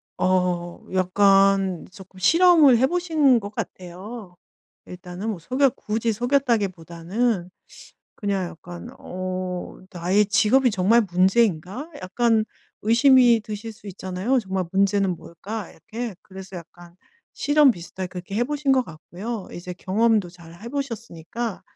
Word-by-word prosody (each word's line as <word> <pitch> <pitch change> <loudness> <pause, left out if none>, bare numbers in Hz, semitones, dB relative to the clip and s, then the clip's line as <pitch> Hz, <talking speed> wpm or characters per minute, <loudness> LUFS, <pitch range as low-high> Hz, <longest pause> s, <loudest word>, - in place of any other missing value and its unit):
어 180 -2 0
약간 195 0 +3
쪼끔 190 -1 -14
실험을 330 - +6
해 260 - +4
보신 310 -6 +3
것 205 - -7
같아요. 185 +2 -8 0.5
일단은 180 +4 -6
뭐 190 - -6
속였 255 - +1
굳이 225 +1 -2
속였다기보다는 205 - -1 0.7
그냥 195 -3 -2
약간 175 +7 -10
어 185 0 -5
나의 185 +4 +1
직업이 220 +5 +3
정말 205 +4 +3
문제인가 190 - +1
약간 225 +3 +1 0.4
의심이 235 +1 +5
드실 215 +1 -7
수 210 - -17
있잖아요. 190 +6 -1
정말 190 -5 -2
문제는 195 -1 +2
뭘까 205 +7 -8
이렇게. 230 -1 -7
그래서 190 0 -11
약간 170 +1 -15 0.4
실험 290 -1 +4
비슷하게 185 -2 -6
그렇게 180 +2 -8
해 240 - +2
보신 290 +1 -1
것 260 -1 +3
같고요. 190 +7 -7
이제 180 +1 -7
경험도 205 +2 +1
잘 170 -2 -15
해 235 - -6
보셨으니까 230 - -5
200 Hz, 280 characters per minute, -23 LUFS, 180-235 Hz, 0.7 s, 실험을